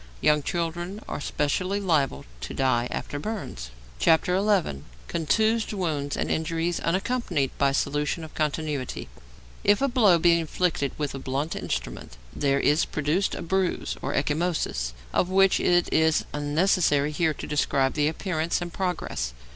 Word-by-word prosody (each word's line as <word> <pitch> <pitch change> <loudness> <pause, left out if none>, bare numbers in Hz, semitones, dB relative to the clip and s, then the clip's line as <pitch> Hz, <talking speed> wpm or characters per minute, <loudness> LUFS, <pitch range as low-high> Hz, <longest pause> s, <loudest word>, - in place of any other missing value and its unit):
Young 150 0 +3
children 175 +5 -3
are - - -4
specially 185 +8 -1
liable 150 - +1
to - - -6
die 125 -3 +2
after 145 - -4
burns. 165 - -5 0.3
XI. 160 - +6 0.9
CONTUSED 220 - +1
WOUNDS 150 -7 -2
AND - - -1
INJURIES 165 +2 -1
UNACCOMPANIED 185 - -1
BY 140 -1 +4
SOLUTION 145 +3 -1
OF 160 - -10
CONTINUITY 150 -3 -2 0.5
If 205 +1 +4
a 275 - +2
blow 220 -9 +5
be 170 0 +4
inflicted 160 -3 0
with 150 -2 -2
a 135 - -5
blunt 135 +4 -2
instrument, - - -5 0.2
there 140 -1 +1
is 150 +3 +3
produced 155 +6 0
a - - -5
bruise, 190 +1 -1
or - - -2
ecchymosis, 145 - -1 0.2
of 180 - +2
which 195 0 +4
it 175 0 +3
is 160 0 +3
unnecessary 150 0 +2
here 160 0 +1
to - - -7
describe 140 -2 +1
the 150 -1 +2
appearance 165 0 -1
and 175 -1 -6
progress. 175 - -2
160 Hz, 145 wpm, -26 LUFS, 145-180 Hz, 0.9 s, XI